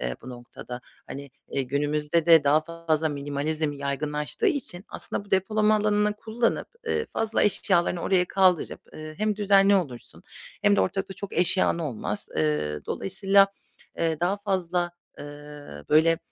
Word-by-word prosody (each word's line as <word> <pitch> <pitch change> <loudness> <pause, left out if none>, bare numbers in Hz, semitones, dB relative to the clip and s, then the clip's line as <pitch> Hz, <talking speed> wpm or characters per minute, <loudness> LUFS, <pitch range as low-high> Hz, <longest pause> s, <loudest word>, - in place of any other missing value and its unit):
eee, 60 0 -3
bu 130 - -8
noktada. 125 0 -9 0.3
Hani, 140 0 -8 0.2
iii, 135 -2 -2
günümüzde 150 +3 0
de 165 -3 +7
daha 150 +2 +4
fazla 160 -1 -1
minimalizm 145 +2 -2
yaygınlaştığı 150 - -2
için 260 - -2
aslında 205 - -5
bu 200 - -20
depolama 215 +3 +2
alanını 210 0 +2
kullanıp, 230 +2 -1 0.2
ııı, 455 - -1
fazla 225 0 -1
eşyalarını 180 -4 +2
oraya 180 -1 +2
kaldırıp, 185 -2 +2
ııı, 155 0 -8
hem 215 -1 0
düzenli 200 -1 +5
olursun 140 -11 -3 0.4
hem 100 - +4
de - - +3
ortalıkta 190 - -2
çok 200 - -7
eşyan 180 0 +2
olmaz. 145 -9 -3
Iıı, 75 -1 0
dolayısıyla, 195 +1 +3 0.5
eee, 165 -2 0
daha 180 +4 +1
fazla, 180 -3 -1 0.3
ııı, 145 - -10
böyle, 160 +2 +4
165 Hz, 145 wpm, -26 LUFS, 145-195 Hz, 0.5 s, de